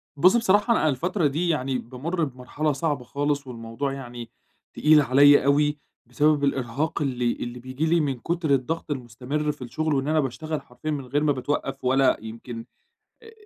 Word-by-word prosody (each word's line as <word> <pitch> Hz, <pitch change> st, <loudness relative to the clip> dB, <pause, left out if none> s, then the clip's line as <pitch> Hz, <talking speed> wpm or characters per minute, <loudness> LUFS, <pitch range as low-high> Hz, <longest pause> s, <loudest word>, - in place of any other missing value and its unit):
بُص 185 Hz, +9 st, +5 dB
بصراحة 210 Hz, +1 st, +3 dB
أنا 155 Hz, -, +2 dB
الفترة 170 Hz, +5 st, 0 dB
دي 160 Hz, +5 st, -1 dB
يعني 135 Hz, -4 st, 0 dB
بامر 145 Hz, +9 st, -3 dB
بمرحلة 140 Hz, +3 st, -2 dB
صعبة 145 Hz, -2 st, -2 dB
خالص، 145 Hz, +2 st, -2 dB
والموضوع 120 Hz, +3 st, -4 dB
يعني 120 Hz, -3 st, -8 dB, 0.4 s
تقيل 150 Hz, 0 st, +5 dB
عليَّ 145 Hz, +1 st, +6 dB
أوي؛ 145 Hz, +1 st, +3 dB, 0.3 s
بسبب 150 Hz, -1 st, +2 dB
الإرهاق 140 Hz, +3 st, -1 dB
اللي 125 Hz, -4 st, 0 dB
اللي 120 Hz, +1 st, -6 dB
بييجي 130 Hz, +5 st, -3 dB
لي 170 Hz, +1 st, +3 dB
من 140 Hz, -5 st, -1 dB
كُترالضغط 160 Hz, -1 st, -1 dB
المستمر 135 Hz, +4 st, -3 dB
في 145 Hz, -, -15 dB
الشغل، 155 Hz, +5 st, -2 dB
وإن 135 Hz, 0 st, 0 dB
أنا 155 Hz, +1 st, +2 dB
باشتغل 155 Hz, +3 st, -3 dB
حرفيًا 130 Hz, +4 st, -6 dB
من 140 Hz, -3 st, -3 dB
غير 145 Hz, +4 st, 0 dB
ما 150 Hz, -, +3 dB
باتوقّف، 135 Hz, +1 st, -3 dB
ولا 130 Hz, +1 st, +3 dB
يمكن 115 Hz, +1 st, -8 dB, 0.6 s
أ -, -, -16 dB
أ 450 Hz, -, -12 dB
140 Hz, 170 wpm, -25 LUFS, 125-155 Hz, 0.6 s, عليَّ